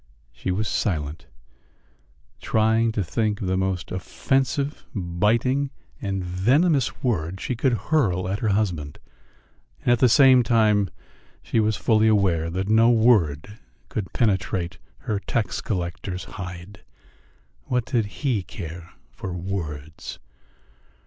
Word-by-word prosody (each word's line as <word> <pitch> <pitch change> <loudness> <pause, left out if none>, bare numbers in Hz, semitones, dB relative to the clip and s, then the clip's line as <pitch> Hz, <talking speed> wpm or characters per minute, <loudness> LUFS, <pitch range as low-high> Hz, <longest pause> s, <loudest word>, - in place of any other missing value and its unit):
She - - -5
was 105 +4 0
silent, 80 -8 -2 1.1
trying 110 +1 +2
to 105 - 0
think 105 +3 -1
of - - -3
the 95 0 0
most 95 -1 -2
offensive, 135 - -1
biting, 110 +10 +1 0.3
and 95 -3 -2
venomous 130 - +2
word 95 -7 -1
she 125 - -2
could 130 +2 +1 0.2
hurl 95 - +2
at 100 +2 -2
her 110 - -1
husband, 90 -8 -1 0.9
and - - +3
at 120 - +4
the 125 - +5
same 130 0 +7
time 110 -4 +3 0.5
she - - 0
was 110 -2 +2
fully 110 +3 +3
aware 95 -7 +2
that 95 +3 -2
no 110 +2 +5
word 105 -6 +3 0.3
could 100 -4 -4
penetrate 95 -4 0 0.2
her 105 -5 -2
tax 105 0 -2
collector's 90 -1 -3
hide. 90 +1 -9 0.8
What 125 -2 0
did 115 -4 0
he 120 -1 -1
care 85 -2 -8 0.2
for 95 - -6
words? 80 -4 -5
100 Hz, 125 wpm, -24 LUFS, 90-115 Hz, 1.1 s, same